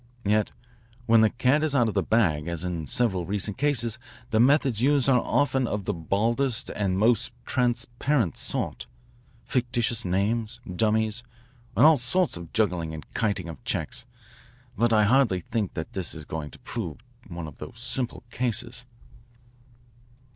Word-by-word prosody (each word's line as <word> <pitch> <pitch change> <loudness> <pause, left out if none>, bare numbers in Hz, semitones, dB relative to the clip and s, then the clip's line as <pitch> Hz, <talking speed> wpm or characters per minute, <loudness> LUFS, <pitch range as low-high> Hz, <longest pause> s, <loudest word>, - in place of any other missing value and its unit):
Yet 105 +1 +2 0.5
when 115 -1 +5
the 110 - +5
cat 130 +6 +2
is 155 -2 +1
out 120 -4 +4
of 110 - -2
the 100 - +2
bag 85 -9 +1
as 85 -1 -2
in 85 -4 -3
several 95 - +3
recent 105 +3 -2
cases 120 -6 +1 0.3
the 110 - +3
methods 130 -2 +4
used 140 0 +3
are 125 -3 +4
often 130 -1 +1
of 105 -3 -3
the 105 - 0
baldest 110 - 0
and 95 -3 -1
most 115 +3 +3
transparent 120 - 0
sort, - - -2 0.6
fictitious 120 -2 0
names, 105 +5 -1
dummies, 110 +4 +1 0.6
and - - +7
all 160 -1 +7
sorts 140 +9 +1
of 85 -1 -9
juggling 90 -7 0
and 75 - -11
kiting 100 -6 -1
of 80 - -9
checks. - - -3 0.7
But 120 +2 +2
I 110 -1 +5
hardly 115 -4 +3
think 115 -3 -3
this 85 +2 -4
is 80 -2 -8
going 75 -2 -5
to - - -13
prove 95 -11 -5 0.3
one 85 -2 -6
of 75 -2 -11
those 115 -3 -9
simple 125 0 -3
cases." 125 0 -2
110 Hz, 155 wpm, -26 LUFS, 95-125 Hz, 0.7 s, and